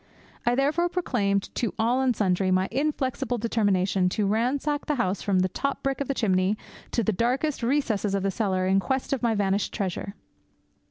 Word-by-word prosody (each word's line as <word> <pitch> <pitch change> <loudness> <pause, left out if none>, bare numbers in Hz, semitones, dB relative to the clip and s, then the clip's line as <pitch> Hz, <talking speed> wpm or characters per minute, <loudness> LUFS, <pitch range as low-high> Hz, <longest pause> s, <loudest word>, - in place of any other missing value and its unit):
I 240 - +4
therefore 300 +6 +2
proclaimed 205 - -1
to 235 - -2
all 240 +4 +2
and 255 -3 +2
sundry 190 -2 +1
my 185 +1 +2
inflexible 270 -2 -1
determination 200 -5 +1
to 205 +3 0
ransack 260 +8 0
the 300 - +1
house 195 -6 -1
from 190 -2 +2
the 185 - +2
top 275 +9 -3
brick 275 0 -1
of 280 - -2
the 275 - -1
chimney 190 -2 +1 0.3
to 235 - 0
the 220 - +1
darkest 255 - 0
recesses 230 -6 0
of 195 - -1
the 195 - +1
cellar 190 -3 0
in 190 +1 +3
quest 265 +6 -1
of 270 - -1
my 235 -2 +2
vanished 200 0 0
treasure. 195 0 -3
225 Hz, 185 wpm, -26 LUFS, 195-265 Hz, 0.3 s, I